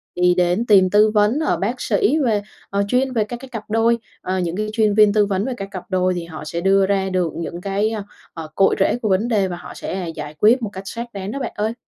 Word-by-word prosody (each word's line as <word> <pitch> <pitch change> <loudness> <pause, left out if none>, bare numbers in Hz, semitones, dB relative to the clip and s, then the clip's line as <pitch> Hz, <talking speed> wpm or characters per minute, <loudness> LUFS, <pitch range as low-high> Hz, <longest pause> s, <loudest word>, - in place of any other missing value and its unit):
đi 180 0 +3
đến 180 +6 +2
tìm 195 -4 +5
tư 210 +2 +5
vấn 210 +6 +3
ở 310 - 0
bác 230 +6 -2
sĩ 405 - +2
về, 215 -4 +1 0.3
ờ, 200 0 0
chuyên 255 +3 +1
về 225 -3 +2
các 240 +3 -6
cái 265 0 -11
cặp 225 -3 -6
đôi, 225 +1 +2 0.2
ờ, 185 +1 -2
những 175 -1 -2
cái 215 - -1
chuyên 215 -2 +2
viên 210 -1 +5
tư 210 -1 +4
vấn 200 0 -1
về 265 - -2
các 195 - -5
cặp 185 -3 -6
đôi 185 -1 +1
thì 175 -1 -4
họ 160 -2 -9
sẽ 170 +3 -4
đưa 195 +1 +4
ra 190 -1 0
được 180 -3 -1
những 170 +1 -5
cái, 200 +2 0
ơ, 220 -2 -4 0.3
ờ, 160 -2 -7
cội 195 - +4
rễ 195 - +2
của 215 - -1
vấn 195 +5 +2
đề 205 -5 +1
và 175 - -4
họ - - -10
sẽ 185 -3 -5
giải 150 0 -6
quyết 235 +4 +5
một 220 - -3
cách 190 +1 -7
xác 235 +2 -6
đáng 195 0 -5
đó 275 - -4
bạn 255 - -3
ơi. 215 +2 -1
200 Hz, 275 wpm, -20 LUFS, 185-225 Hz, 0.3 s, tìm